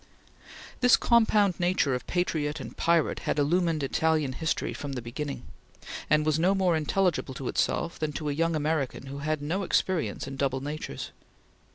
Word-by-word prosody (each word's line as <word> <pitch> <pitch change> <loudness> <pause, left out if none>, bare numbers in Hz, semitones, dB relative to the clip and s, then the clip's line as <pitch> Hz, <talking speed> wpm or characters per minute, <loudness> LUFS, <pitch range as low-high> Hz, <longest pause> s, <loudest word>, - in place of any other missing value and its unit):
This 250 -1 +6
compound 215 -5 +3
nature 175 -6 +2
of 125 - -4
patriot 155 -4 -1
and - - -8
pirate 170 -2 +2
had - - -2
illumined 165 +1 +1
Italian 155 -1 +1
history 160 +4 -2
from 145 -1 -6
the 130 - -3
beginning, 140 +4 -5 0.7
and 150 0 +3
was 155 0 +2
no 185 +4 +3
more 185 -3 +2
intelligible 160 -3 0
to 130 - -5
itself 170 - -1
than 155 -1 -1
to 150 - -4
a 145 - 0
young 165 +2 +1
American 150 -3 -1
who 140 +1 -7
had 155 0 -2
no 170 +7 -1
experience 170 - 0
in 135 0 -6
double 135 -1 0
natures. 145 - -5
155 Hz, 170 wpm, -28 LUFS, 140-175 Hz, 0.7 s, This